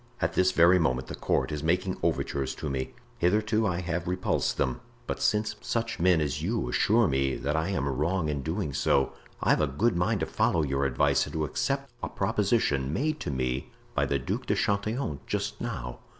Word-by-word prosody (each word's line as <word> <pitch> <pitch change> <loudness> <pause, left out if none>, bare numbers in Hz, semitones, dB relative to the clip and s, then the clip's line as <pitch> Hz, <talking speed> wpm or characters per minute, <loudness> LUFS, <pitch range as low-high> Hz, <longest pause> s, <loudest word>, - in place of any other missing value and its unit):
At - - 0
this 95 0 +3
very 90 +1 +6
moment 65 -5 0
the - - -4
court - - 0
is 75 -1 -3
making 90 +4 +1
overtures 70 -1 -1
to 75 - -4
me; 65 -1 -3 0.2
hitherto 110 +4 +2
I 90 -1 -1
have 85 -1 -3
repulsed 90 +1 0
them; 60 -2 -1 0.2
but - - -4
since 105 0 +1
such 115 0 -2
men 90 -1 +4
as 75 -3 -1
you - - -1
assure 110 - +3
me 65 -1 +1
that 70 +3 -2
I 80 +1 0
am 70 -8 -1
wrong 80 +6 0
in 75 -2 -1
doing 80 0 -2
so, 70 +1 +2 0.3
I've - - +3
a 75 - +2
good 90 - +1
mind 90 +1 +1
to - - +1
follow 80 - +1
your 70 -1 0
advice 65 - +2
and - - -9
to 80 -1 0
accept 135 - -2
a - - -3
proposition 95 - +1
made 155 - -1
to - - -4
me 65 -1 -2 0.2
by - - +1
the 70 - +1
Duc 100 - -3
de - - +2
Chatillon 105 - -1
just - - -3
now." 60 0 -4
85 Hz, 200 wpm, -28 LUFS, 70-100 Hz, 0.3 s, very